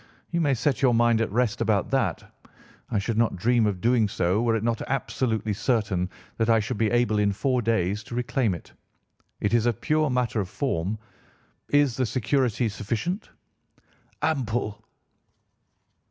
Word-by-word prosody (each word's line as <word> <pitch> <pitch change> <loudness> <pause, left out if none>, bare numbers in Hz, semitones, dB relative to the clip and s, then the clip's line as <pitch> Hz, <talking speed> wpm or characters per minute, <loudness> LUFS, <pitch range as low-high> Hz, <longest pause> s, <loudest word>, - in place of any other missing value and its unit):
You 170 0 +1
may 145 -4 +2
set 140 +3 0
your 125 -3 +4
mind 115 -1 +3
at 115 - -1
rest 120 0 0
about - - +1
that. - - 0 0.7
I - - 0
should 110 +3 -1
not 115 - +2
dream 115 +4 +2
of 100 -3 -2
doing 115 -2 +3
so 95 +1 0
were 115 -1 +2
it 110 - -1
not 115 -1 0
absolutely 115 -5 -1
certain 100 -5 0 0.3
that 115 0 +1
I 115 -1 +5
should 110 +2 -3
be 110 -2 +2
able 120 -2 +2
in 100 -1 +3
four 125 +5 0
days 105 -3 0
to 120 - -7
reclaim 120 -4 0
it. 85 - -12 0.7
It 105 - 0
is 120 0 +3
a 120 - +3
pure 155 +7 +1
matter 125 -3 0
of 95 -3 -2
form. 105 - -2 0.7
Is 145 -4 +3
the 130 -2 +1
security 125 -1 +1
sufficient?' 110 - -3 0.9
"'Ample. 120 -8 -1
115 Hz, 165 wpm, -26 LUFS, 105-125 Hz, 0.9 s, I